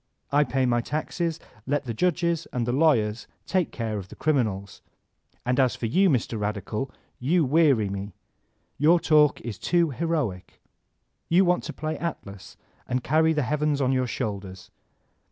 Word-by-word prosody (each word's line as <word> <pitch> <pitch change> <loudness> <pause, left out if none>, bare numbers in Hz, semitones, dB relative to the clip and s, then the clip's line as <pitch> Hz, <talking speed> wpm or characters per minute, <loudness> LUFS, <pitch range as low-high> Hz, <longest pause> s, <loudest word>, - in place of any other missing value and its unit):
I 145 +1 +4
pay 130 +1 0
my 120 -1 +2
taxes; 160 +4 -3 0.3
let 145 +1 0
the 120 - -3
judges 170 +3 0
and 120 -2 -1
the 120 - 0
lawyers 125 -7 +2 0.2
take 185 -3 0
care 110 -3 -3
of 95 - -8
the - - -11
criminals. 110 -11 -1 0.6
And 125 +1 +1
as 130 -2 +3
for - - -4
you, 185 - +3
Mr. 120 -5 0
Radical, 105 +4 -3 0.3
you 155 +6 +2
weary 140 -7 +3
me. 100 0 -6 0.6
Your 165 +4 +5
talk 150 -3 +4
is 110 -5 -6
too 170 -3 +2
heroic. 140 - -3 0.7
You 185 +3 +5
want 180 0 +2
to 155 - -5
play 155 0 -4
Atlas 100 - -6 0.3
and 125 0 -1
carry 160 +4 +3
the 150 -2 +1
heavens 150 +1 0
on 130 -2 +2
your 130 -1 +1
shoulders. 100 -6 -5
135 Hz, 160 wpm, -25 LUFS, 110-160 Hz, 0.7 s, Your